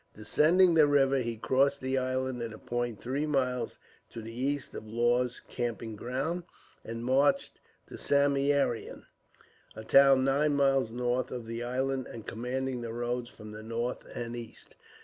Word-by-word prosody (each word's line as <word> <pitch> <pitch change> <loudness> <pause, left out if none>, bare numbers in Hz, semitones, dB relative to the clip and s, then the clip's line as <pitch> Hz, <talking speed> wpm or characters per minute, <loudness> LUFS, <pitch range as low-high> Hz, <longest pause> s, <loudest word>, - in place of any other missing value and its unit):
Descending 155 - +4
the 155 -2 +6
river, 135 -1 +3
he 115 -2 -3
crossed 135 +4 +2
the 130 0 -2
island 130 -1 -1
at 115 -1 -4
a - - -11
point 120 -2 -3
three 140 +5 -2
miles 125 -4 -1 0.3
to - - -8
the 115 +1 -8
east 135 +3 -2
of 110 - -8
Law's 120 +2 +1
camping 115 -2 -4
ground, 135 +10 -2 0.4
and 115 +1 -6
marched 140 - +2 0.3
to - - -10
Samieaveram, 140 -3 +1 0.7
a 110 - -7
town 135 +3 +6
nine 145 +2 +2
miles 135 -4 +2
north 125 +1 -1
of 125 -2 -6
the 115 +1 -5
island, 130 +2 -1
and 115 -2 -9
commanding 125 +2 -3
the 115 -1 -5
roads 120 0 -2
from 110 0 -11
the 105 0 -8
north 115 +2 -3 0.2
and 120 0 -4
east. 120 -2 -10
125 Hz, 160 wpm, -30 LUFS, 120-135 Hz, 0.7 s, the